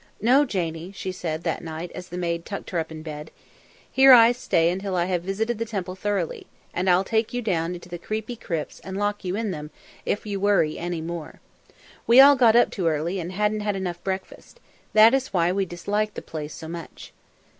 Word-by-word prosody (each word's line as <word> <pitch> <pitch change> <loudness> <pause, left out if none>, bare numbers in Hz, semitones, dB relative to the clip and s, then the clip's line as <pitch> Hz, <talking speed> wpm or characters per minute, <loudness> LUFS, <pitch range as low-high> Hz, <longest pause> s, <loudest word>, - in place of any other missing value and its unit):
"No, 255 +7 +4
Janie," 170 - -3
she 190 -1 -5
said 165 -3 -4
that - - -2
night, 165 +1 -6
as 180 -1 -8
the 180 - -6
maid 170 -1 -2
tucked 200 - -7
her 175 - 0
up 160 0 -4
in 155 -1 -8
bed. 150 -1 -7 0.6
"Here 265 0 +8
I 230 -1 +8
stay 170 -8 +1
until 190 +1 -3
I 175 -1 +1
have 180 -2 -1
visited 215 +5 -2
the - - 0
Temple 195 -5 -4
thoroughly, 190 -3 -3 0.3
and 185 +2 0
I'll 180 +1 +4
take 220 +3 -1
you 245 - -1
down 175 -4 -1
into 175 0 -11
the 175 -1 -7
creepy 220 +6 -4
crypts 165 -8 -5
and 190 0 -7
lock 205 0 -1
you 185 0 -2
in 215 -1 -2
them 150 -3 -6 0.3
if 205 - -2
you 200 -2 -3
worry 195 -6 +2
any 175 -1 -3
more. 165 -1 -6 0.7
We 235 +3 +7
all 280 +1 +9
got 235 -4 +5
up 240 - +5
too 185 -6 -1
early 165 +4 -1
and 175 +1 -5
hadn't 210 +2 0
had 205 -1 -1
enough 180 -3 -4
breakfast 190 - -6 0.3
that 220 +2 +7
is 265 -5 0
why 175 -1 +2
we 195 +1 0
disliked 205 +5 -2
the - - -6
place 155 -1 -6
so 160 - -8
much." 170 0 -9
185 Hz, 215 wpm, -24 LUFS, 170-215 Hz, 0.7 s, all